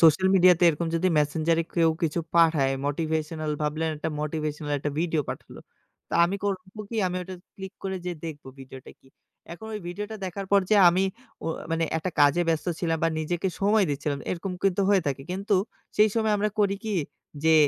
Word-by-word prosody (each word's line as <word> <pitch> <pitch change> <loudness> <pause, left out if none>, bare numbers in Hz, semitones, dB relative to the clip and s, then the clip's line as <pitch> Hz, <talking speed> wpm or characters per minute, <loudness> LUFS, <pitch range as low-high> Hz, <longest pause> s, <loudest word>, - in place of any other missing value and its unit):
social 165 +3 +6
media 185 -1 +7
তে - - -4
এরকম 165 +1 0
যদি 180 +3 +2
Messenger 155 +3 +1
এ - - -12
কেউ 165 -2 +4
কিছু 165 0 0 0.2
পাঠায় 160 -5 +4
motivational 155 +1 -2
ভাবলেন 155 +2 -1
একটা 150 - -3
motivational 150 -1 -3
একটা 145 - -2
ভিডিও 165 -3 0
পাঠালো। - - -9 0.5
তা - - -4
আমি 185 +3 -1
করব 195 -2 -1 0.3
কি? 230 - -4
আমি 180 0 -2
ওটা 185 +1 -7 0.2
click 190 +1 -8
করে 190 0 -2
যেয়ে 180 -1 -3
দেখব 150 -2 -7 0.2
ভিডিওটা 130 -1 -11
কি। - - -25 0.5
এখন 200 +6 -9
ঐ - - -1
ভিডিওটা 210 +5 -5
দেখার 190 +2 -5
পর 200 - +7
যে - - +6
আমি 180 +2 +2 0.4
ও - - -3 0.2
মানে 165 0 +1
একটা 160 +3 -2
কাজে 145 +4 +5
ব্যস্ত 160 0 0
ছিলাম 165 -2 0
বা - - +4
নিজেকে 175 +4 -1
সময় 205 +1 +4
দিচ্ছিলাম। 145 0 -2
এরকম 185 +2 -3
কিন্তু 195 0 +2
হয়ে 200 -2 +4
থাকে। 135 -1 -2
কিন্তু 200 +3 0 0.4
সেই 215 +1 +6
সময় 220 -1 +2
আমরা 210 +1 0
করি 200 -1 +3
কি? 215 - -1 0.5
যে, 160 0 +6
170 Hz, 195 wpm, -26 LUFS, 155-190 Hz, 0.5 s, media